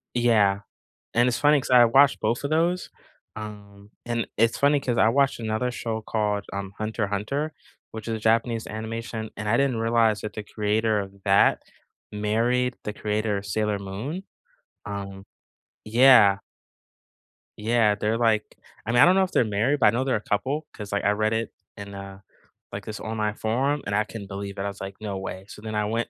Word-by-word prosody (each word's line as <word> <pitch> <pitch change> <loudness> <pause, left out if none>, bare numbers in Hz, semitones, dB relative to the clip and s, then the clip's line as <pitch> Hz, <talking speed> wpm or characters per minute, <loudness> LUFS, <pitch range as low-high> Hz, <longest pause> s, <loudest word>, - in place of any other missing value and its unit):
Yeah. 105 -5 +3 0.5
And 120 +1 +3
it's 120 - 0
funny 145 0 +4
'cause - - -7
I 125 -1 +8
watched 135 +4 +5
both 115 +5 -1
of 140 - -2
those, 170 +3 +1 0.5
um, 105 -1 -10 0.2
and 120 -1 -1
it's 115 +2 +2
funny 145 +1 +4
'cause 125 -3 -2
I 110 - +5
watched 135 +1 +2
another 110 +2 -1
show 115 -2 -3
called, 105 -2 -1
um, 100 -1 -5
Hunter 110 -1 -2
Hunter, 140 +10 -2 0.4
which 110 -1 -8
is 110 -2 -3
Japanese 115 +1 +1
animation, 110 0 -5
and 105 - -4
I 115 - +3
didn't 135 -3 +1
realize 115 -1 +2
that 105 -1 -6
the 105 - -6
creator 105 +1 0
of 100 0 -9
that 100 -1 +4 0.5
married 115 +4 0
the 105 - -3
creator 105 0 -1
of 100 - -8
Sailor 105 +1 -1
Moon. 115 - -5 0.6
Um 100 -1 -6 0.6
yeah. 110 -3 +6 1.2
Yeah, 110 -1 +2
they're 105 +2 -1
like 110 -2 +1 0.3
I 115 - -1
mean, 120 0 +5
I - - +9
don't 180 +2 +5
know 190 - +4
if 185 - -3
they're - - +3
married, 110 +8 +1
but 110 - +5
I - - +8
know 120 +4 0
they're 130 -1 0
a 105 - -2
couple 135 +10 -2
'cause, 105 -2 -8
like, 100 - -1
I - - +3
read 110 +1 0
it 115 +1 -2 0.3
in 100 0 -8
a 100 0 -9 0.5
like, - - -6
this 105 -1 -6
online 110 -1 -2
forum, 135 +7 0
and 100 - -1
I 105 - +3
couldn't 100 0 -9
believe 100 0 -6
it, - - -3
I - - -2
was 100 -1 -7
like, 95 0 -6
"No 105 -3 -4
way." 95 0 -6
So, 105 - -11
then 110 -1 -5
I 105 0 +1
went 115 +2 -2
110 Hz, 200 wpm, -25 LUFS, 105-120 Hz, 1.2 s, I